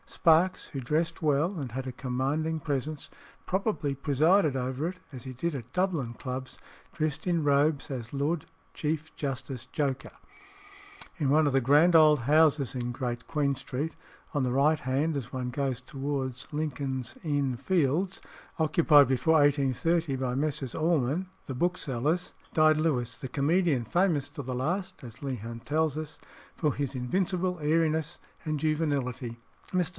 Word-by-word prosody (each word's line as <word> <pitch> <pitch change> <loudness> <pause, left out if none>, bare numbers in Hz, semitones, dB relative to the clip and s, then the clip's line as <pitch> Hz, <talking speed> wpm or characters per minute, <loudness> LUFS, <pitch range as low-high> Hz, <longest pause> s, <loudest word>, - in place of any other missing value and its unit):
Sparkes, 170 +1 +3
who 135 - -5
dressed 160 +6 -1
well 155 +5 +1
and 135 -6 -4
had 130 +2 -4
a - - -3
commanding 140 +6 -1
presence, 145 +1 -3 0.4
probably 190 -7 0
presided 150 +3 +3
over 130 +4 -2
it, 185 - -8
as 130 -4 -8
he 130 - -6
did 150 +6 -2
at 125 -3 -7
Dublin 175 -10 0
clubs, 130 +1 -6 0.3
dressed 155 -3 -2
in 170 -3 +2
robes 145 +1 +2
as 120 -4 -5
Lord 145 +3 -1 0.3
Chief 155 +1 -3
Justice 130 -2 -4
Joker. 135 -1 -2 1.1
In 145 -6 0
one 150 +2 +4
of 140 - 0
the 135 - +4
grand 150 +7 +5
old 155 -3 +7
houses 145 -1 +3
in 120 -1 -2
Great 120 -2 -4
Queen 145 -3 +1
Street, 140 +4 -4 0.4
on 145 -3 +1
the 125 - 0
right 145 +4 +3
hand 140 +5 0
as 135 -6 -4
one 125 -1 -3
goes 130 -1 -1
towards 135 -3 -3
Lincoln's 140 -4 -3
Inn 145 -5 0
Fields, 170 +6 0 0.4
occupied 155 -2 +5
before 135 +5 +2
1830 145 +2 +2
by 125 -1 -1
Messrs. 140 -3 -2
Allman 160 +1 +1 0.2
the 130 - -5
booksellers, 160 0 -1 0.2
died 155 -1 +5
Lewis 130 -7 0
the 130 - -6
comedian, 145 -1 +2
famous 170 - +1
to 155 - -7
the 130 -1 -4
last, 180 +8 -2
as 115 -2 -10
Leigh 135 -2 -2
Hunt 115 +1 -8
tells 155 0 +1
us, 155 -1 -6 0.4
for 150 -4 +1
his 140 -1 -3
invincible 180 +7 -1
airiness 160 +1 +1 0.2
and 155 -2 -2
juvenility. 140 -6 -1 0.3
"Mr. 180 -2 +1
145 Hz, 155 wpm, -29 LUFS, 130-160 Hz, 1.1 s, old